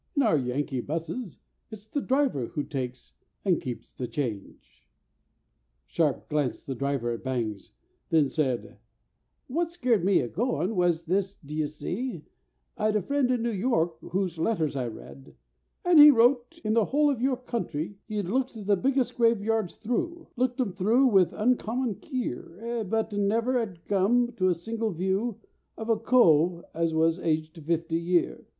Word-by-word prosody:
"In 280 Hz, -, +3 dB
our 215 Hz, -8 st, +4 dB
Yankee 130 Hz, -1 st, -1 dB
'busses 165 Hz, -, -4 dB, 0.3 s
It's 215 Hz, -2 st, -10 dB
the 280 Hz, +6 st, -3 dB
driver 260 Hz, -, +1 dB
who 145 Hz, -, -3 dB
takes 130 Hz, -3 st, -6 dB, 0.3 s
(and 180 Hz, -4 st, +2 dB
keeps) 125 Hz, -2 st, -7 dB
the 125 Hz, -, -4 dB
change!" 105 Hz, -, -6 dB, 1.0 s
Sharp 155 Hz, -5 st, 0 dB
glanced 150 Hz, -4 st, -1 dB
the 135 Hz, -, -3 dB
driver 135 Hz, -2 st, -1 dB
at 115 Hz, -, -5 dB
Bangs; 115 Hz, -6 st, -3 dB, 0.4 s
then 155 Hz, -3 st, +4 dB
said, 130 Hz, -7 st, -2 dB, 0.7 s
"What 330 Hz, +6 st, -1 dB
scared 250 Hz, -, +1 dB
me 195 Hz, +1 st, +4 dB
of 120 Hz, -, -5 dB
goin' 215 Hz, -, 0 dB
was 175 Hz, -2 st, +1 dB
this, 195 Hz, +3 st, 0 dB
d'ye 150 Hz, +1 st, -3 dB
see,— 175 Hz, -, -5 dB, 0.5 s
I'd 215 Hz, 0 st, 0 dB
a 210 Hz, -, +2 dB
friend 280 Hz, +3 st, +1 dB
in 245 Hz, -2 st, +1 dB
New 235 Hz, -, 0 dB
York, 185 Hz, -6 st, 0 dB
whose 180 Hz, -3 st, -3 dB
letters 160 Hz, -5 st, 0 dB
I 130 Hz, -3 st, -1 dB
read; 70 Hz, -, -11 dB, 0.5 s
And 350 Hz, -3 st, +6 dB
he 295 Hz, 0 st, +12 dB
wrote: 250 Hz, +4 st, +3 dB
In 215 Hz, -, +2 dB
the 225 Hz, -2 st, +3 dB
whole 295 Hz, +1 st, +3 dB
of 250 Hz, -4 st, -3 dB
your 260 Hz, 0 st, +1 dB
country, 205 Hz, -, -4 dB
He 215 Hz, -1 st, -4 dB
'ad 205 Hz, -, -1 dB
looked 255 Hz, +5 st, -1 dB
the 200 Hz, 0 st, +4 dB
biggest 260 Hz, +4 st, 0 dB
graveyards 225 Hz, -4 st, +1 dB
through, 335 Hz, +9 st, -3 dB
Looked 250 Hz, +1 st, 0 dB
'em 240 Hz, -7 st, 0 dB
through 220 Hz, +8 st, +3 dB
with 190 Hz, -5 st, +4 dB
uncommon 240 Hz, +1 st, 0 dB
keer, 235 Hz, -, -4 dB
But 220 Hz, 0 st, 0 dB
never 225 Hz, +5 st, +1 dB
'ad 195 Hz, -8 st, -5 dB
come 230 Hz, +5 st, +2 dB
to 185 Hz, -, +2 dB
a 180 Hz, -, +2 dB
single 225 Hz, +6 st, -3 dB
view 190 Hz, +6 st, -1 dB, 0.4 s
Of 220 Hz, +1 st, -6 dB
a 225 Hz, -, +5 dB
cove 175 Hz, -9 st, +3 dB
as 165 Hz, 0 st, 0 dB
wos 160 Hz, +2 st, +2 dB
aged 160 Hz, -1 st, -2 dB
fifty 165 Hz, +1 st, 0 dB
year. 175 Hz, 0 st, 0 dB
195 Hz, 165 wpm, -27 LUFS, 155-240 Hz, 1.0 s, he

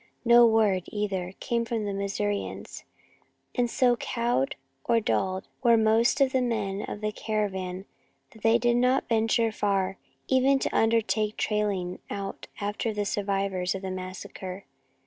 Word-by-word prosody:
No 235 Hz, 0 st, +8 dB
word, 210 Hz, -5 st, +2 dB
either, 195 Hz, -3 st, -3 dB
came 235 Hz, -1 st, 0 dB
from 230 Hz, -2 st, -2 dB
the 200 Hz, -, -2 dB
Missourians, 200 Hz, +1 st, -3 dB, 0.7 s
and 245 Hz, -1 st, +1 dB
so 245 Hz, 0 st, +3 dB
cowed 235 Hz, -, -1 dB, 0.3 s
or 230 Hz, -, +3 dB
dulled 190 Hz, -3 st, -1 dB
were 235 Hz, -2 st, +5 dB
most 225 Hz, +4 st, +3 dB
of 270 Hz, -1 st, +4 dB
the 260 Hz, -1 st, +2 dB
men 210 Hz, -5 st, -1 dB
of 210 Hz, -, -6 dB
the 215 Hz, 0 st, -1 dB
caravan 190 Hz, -4 st, -3 dB, 0.5 s
that 220 Hz, -, -17 dB
they 225 Hz, +1 st, +4 dB
did 240 Hz, 0 st, +2 dB
not 250 Hz, +2 st, +2 dB
venture 225 Hz, 0 st, +2 dB
far, 195 Hz, -2 st, 0 dB, 0.3 s
even 265 Hz, +1 st, +4 dB
to -, -, -2 dB
undertake 220 Hz, -1 st, +2 dB
trailing 200 Hz, -4 st, -1 dB
out 200 Hz, -1 st, -5 dB
after 210 Hz, +2 st, -2 dB
the 210 Hz, -1 st, -2 dB
survivors 195 Hz, -2 st, -1 dB
of 195 Hz, -, -6 dB
the 190 Hz, -, -3 dB
massacre. 185 Hz, +1 st, -7 dB
210 Hz, 145 wpm, -27 LUFS, 195-230 Hz, 0.7 s, No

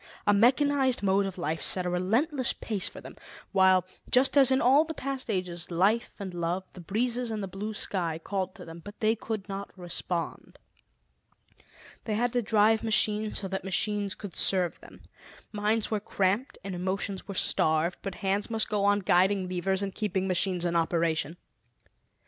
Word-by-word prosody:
A 205 Hz, -, +4 dB
mechanized 260 Hz, +3 st, +3 dB
mode 195 Hz, 0 st, +2 dB
of 190 Hz, -, -7 dB
life 160 Hz, -2 st, -2 dB
set 185 Hz, -1 st, +2 dB
a -, -, 0 dB
relentless 240 Hz, -, +1 dB
pace 210 Hz, -4 st, -3 dB
for -, -, -11 dB
them, -, -, -11 dB, 0.4 s
while, 190 Hz, -1 st, +4 dB, 0.2 s
just 260 Hz, +3 st, +3 dB
as 275 Hz, -2 st, +6 dB
in 260 Hz, 0 st, +3 dB
all 275 Hz, +5 st, +5 dB
the 320 Hz, 0 st, -6 dB
past 270 Hz, -2 st, -4 dB
ages, 180 Hz, -4 st, -3 dB
life 195 Hz, +7 st, +1 dB
and 195 Hz, -3 st, -6 dB
love, 175 Hz, +2 st, -2 dB
the 180 Hz, -, -10 dB
breezes 235 Hz, +6 st, -1 dB
and 215 Hz, -2 st, -3 dB
the -, -, -3 dB
blue 200 Hz, +3 st, -5 dB
sky 170 Hz, -6 st, -1 dB
called 190 Hz, +2 st, -3 dB
to 185 Hz, -, -10 dB
them; 165 Hz, 0 st, -10 dB
but 205 Hz, 0 st, -11 dB
they 220 Hz, +1 st, +2 dB
could 220 Hz, -2 st, -5 dB
not 200 Hz, 0 st, -5 dB
respond. 175 Hz, -1 st, -5 dB, 1.5 s
They 215 Hz, -, -1 dB
had 240 Hz, +2 st, 0 dB
to 245 Hz, -, +2 dB
drive 220 Hz, 0 st, +3 dB
machines 215 Hz, -1 st, +2 dB
so 195 Hz, -, -4 dB
that 190 Hz, 0 st, -3 dB
machines 200 Hz, +1 st, 0 dB
could 200 Hz, -5 st, -9 dB
serve 185 Hz, -3 st, +2 dB
them. -, -, -15 dB, 0.5 s
Minds 215 Hz, +1 st, 0 dB
were 215 Hz, -, +1 dB
cramped 200 Hz, +5 st, -1 dB
and 195 Hz, -1 st, -5 dB
emotions 190 Hz, +2 st, -3 dB
were 200 Hz, -, -6 dB
starved, 160 Hz, 0 st, +2 dB
but 195 Hz, -2 st, -5 dB
hands 200 Hz, +3 st, 0 dB
must 225 Hz, -1 st, 0 dB
go 205 Hz, -1 st, 0 dB
on 205 Hz, 0 st, +3 dB
guiding 185 Hz, +1 st, +2 dB
levers 190 Hz, +2 st, -1 dB
and 195 Hz, -1 st, -3 dB
keeping 190 Hz, -3 st, -1 dB
machines 185 Hz, -1 st, 0 dB
in 170 Hz, 0 st, 0 dB
operation. 165 Hz, -1 st, 0 dB
195 Hz, 180 wpm, -28 LUFS, 185-220 Hz, 1.5 s, as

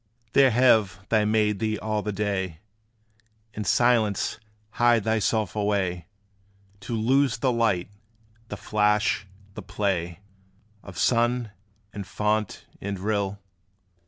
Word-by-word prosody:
There 135 Hz, -1 st, +6 dB
have 110 Hz, -6 st, +3 dB
they 110 Hz, -2 st, +3 dB
made 105 Hz, -1 st, +1 dB
thee 110 Hz, 0 st, -1 dB
all 110 Hz, -1 st, -2 dB
the 105 Hz, -, -3 dB
day 95 Hz, -4 st, -2 dB, 1.0 s
In 105 Hz, -, -4 dB
silence 110 Hz, 0 st, +2 dB, 0.3 s
hide 120 Hz, -2 st, +3 dB
thyself 110 Hz, -1 st, 0 dB
away, 95 Hz, -5 st, -1 dB, 0.7 s
To 115 Hz, +4 st, -5 dB
lose 130 Hz, +3 st, +2 dB
the 130 Hz, +3 st, +1 dB
light, 110 Hz, -6 st, 0 dB, 0.6 s
the -, -, -6 dB
flash, 105 Hz, -2 st, +1 dB, 0.3 s
the -, -, -7 dB
play 90 Hz, -3 st, -2 dB, 0.6 s
Of 95 Hz, -3 st, -12 dB
sun, 120 Hz, +3 st, +1 dB, 0.4 s
and 100 Hz, -2 st, -6 dB
fount, 105 Hz, +2 st, -1 dB, 0.2 s
and 100 Hz, 0 st, -4 dB
rill? 100 Hz, 0 st, -2 dB
105 Hz, 115 wpm, -25 LUFS, 100-115 Hz, 1.0 s, There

